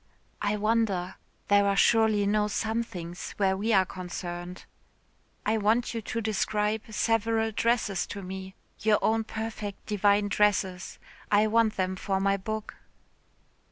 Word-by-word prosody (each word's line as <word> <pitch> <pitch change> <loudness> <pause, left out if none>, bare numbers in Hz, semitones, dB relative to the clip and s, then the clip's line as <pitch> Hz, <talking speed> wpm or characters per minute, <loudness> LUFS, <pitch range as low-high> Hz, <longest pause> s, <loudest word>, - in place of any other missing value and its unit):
"I 205 +1 0
wonder. 205 -4 0 0.3
There 200 0 +4
are 200 - +2
surely 220 -1 +4
no 210 +1 +2
somethings 210 -6 -3
where 190 -2 +2
we 210 +4 -1
are 190 -3 +5
concerned." 180 -1 -7 0.8
"I 220 +1 +1
want 225 +4 +1
you 230 - -3
to 225 +2 -3
describe 215 0 0
several 225 0 +1
dresses 220 -4 0
to 200 -1 -7
me. 190 +1 -7 0.2
Your 215 0 +3
own 225 0 +2
perfect 220 -2 -6
divine 205 0 +2
dresses. 195 -3 0 0.3
I 210 +1 +5
want 220 0 +2
them 185 0 0
for 190 +1 -1
my 195 0 +2
book." 215 +2 -5
210 Hz, 135 wpm, -28 LUFS, 190-220 Hz, 0.8 s, are